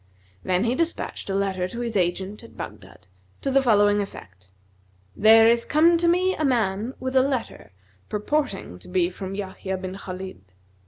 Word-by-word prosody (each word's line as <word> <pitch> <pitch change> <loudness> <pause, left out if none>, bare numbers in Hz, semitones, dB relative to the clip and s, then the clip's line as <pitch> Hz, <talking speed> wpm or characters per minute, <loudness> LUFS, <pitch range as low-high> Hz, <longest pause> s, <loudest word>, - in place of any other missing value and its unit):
Then 185 +1 +1
he 235 +1 +1
despatched 330 -7 -2
a 195 - -1
letter 190 -2 0
to 235 +6 -7
his 235 -2 -3
agent 190 +2 -1
at - - -15
Baghdad, - - -9 0.4
to 275 - -1
the 275 +1 +4
following 205 -4 +4
effect: 95 - -10 0.6
"There 225 +1 +7
is 235 0 +3
come 330 +3 +4
to 340 - +2
me 365 +2 +3
a 310 - -3
man 230 -3 0
with 260 +1 -4
a 260 - +6
letter 260 - -3 0.4
purporting 210 - -2
to - - -14
be 180 -1 +1
from 190 +1 -6
Yahya 190 -1 -4
bin 185 0 -6
Khбlid. 190 - -7
205 Hz, 170 wpm, -24 LUFS, 190-260 Hz, 0.6 s, There